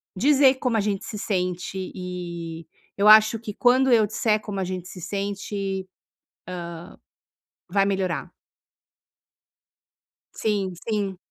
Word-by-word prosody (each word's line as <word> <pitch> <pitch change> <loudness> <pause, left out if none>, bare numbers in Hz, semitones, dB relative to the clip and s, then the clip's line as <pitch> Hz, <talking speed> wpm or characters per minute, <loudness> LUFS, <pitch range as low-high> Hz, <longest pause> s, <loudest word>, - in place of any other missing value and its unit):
dizer 270 +4 +5
como 250 -3 0
a - - +3
gente 200 0 -2
se 215 - -6
sente 185 -3 -2 0.2
e 170 -3 -6 0.3
eu 200 +1 +3
acho 220 +1 +7
que 215 -2 -7
quando 255 +2 +4
eu 225 -3 +6
disser 215 +1 +1
como 205 -2 -5
a - - 0
gente 185 -1 -5
se 180 - -10
sente, 195 +1 -3 1.9
hã, - - -19
vai 195 0 +4
melhorar. 190 -3 -1 2.0
Sim, 200 -4 -1
sim. 200 -4 -1
200 Hz, 120 wpm, -24 LUFS, 185-220 Hz, 2.0 s, acho